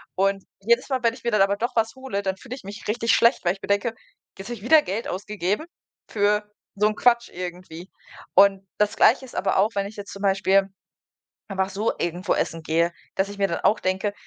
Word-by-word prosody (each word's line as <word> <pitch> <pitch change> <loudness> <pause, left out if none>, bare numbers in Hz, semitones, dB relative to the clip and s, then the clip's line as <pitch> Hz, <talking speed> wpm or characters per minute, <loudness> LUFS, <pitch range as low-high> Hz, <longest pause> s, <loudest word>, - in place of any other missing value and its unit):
Und 195 0 +1 0.2
jedes 235 +5 +2
Mal, 260 -2 0
wenn 230 -1 +3
ich 250 - -16
mir 235 - 0
dann 210 -3 +3
aber 200 +1 +3
doch 240 +3 -3
was 225 +1 +1
hole, 260 -6 -4
dann 190 -1 -2
fühle 250 +3 -9
ich - - -12
mich 200 +3 -9
richtig 230 +1 +1
schlecht, 235 +3 +4
weil 175 - +3
ich 195 - -15
mir - - -5
denke: 200 +3 +1 0.4
„Jetzt 195 - -8
habe - - -3
ich 200 - -14
wieder 310 +6 +6
Geld 205 +5 -3
ausgegeben 205 - -2 0.4
für 210 0 +2 0.3
so 210 +1 +3
'n 215 - -4
Quatsch 240 0 +3
irgendwie.“ 180 0 -8 0.5
Und 195 0 +5
das 210 0 +1
Gleiche 260 +3 +4
ist 250 - -14
aber - - 0
auch, 200 +3 +4
wenn 200 0 0
ich 210 - -11
jetzt 205 -1 -8
zum 195 - -9
Beispiel 195 0 +3 0.8
einfach 190 -1 -1
so 205 +4 -1
irgendwo 175 +2 -1
essen 165 0 -2
gehe, 165 +2 +1 0.2
dass 190 +1 0
ich 205 0 -9
mir 200 - +3
dann 170 - -2
auch 210 - +3
denke: 190 +2 -1
200 Hz, 225 wpm, -24 LUFS, 190-225 Hz, 0.8 s, wieder